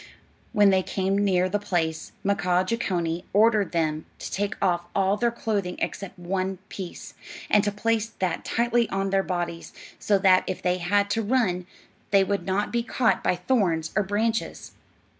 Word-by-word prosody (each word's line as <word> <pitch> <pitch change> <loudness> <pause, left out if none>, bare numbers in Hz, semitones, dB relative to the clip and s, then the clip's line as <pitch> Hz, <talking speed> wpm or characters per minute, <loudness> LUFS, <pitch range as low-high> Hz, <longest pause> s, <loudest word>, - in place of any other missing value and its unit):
When 205 -1 +5
they 190 -1 +3
came 190 +1 -1
near 190 -3 +2
the 205 +2 -1
place, 165 -5 -2
Mkaaah 185 -2 +2
Jeechonee 175 -6 -1
ordered 210 -2 +4
them 155 -2 -1
to - - -7
take 205 +1 -1
off 175 -2 0
all 195 0 +2
their 235 +3 +1
clothing 205 -6 -2
except 195 -1 -4
one 185 +2 -2
piece, 185 -3 -8 0.4
and 210 - +5
to 205 - 0
place 220 +1 0
that 180 -3 -1
tightly 235 0 +1
on 195 0 -1
their 195 0 +3
bodies, 175 -3 -4 0.3
so 205 - +2
that 190 -1 +5
if 185 - -3
they 180 0 0
had 200 +3 +1
to 225 - +1
run 205 -6 0 0.4
they 195 -1 +5
would 195 -2 -2
not 195 +2 0
be 235 - +2
caught 235 0 +1
by - - +2
thorns 175 -6 0
or 215 - +4
branches. 220 +3 -2
195 Hz, 170 wpm, -25 LUFS, 180-210 Hz, 0.4 s, When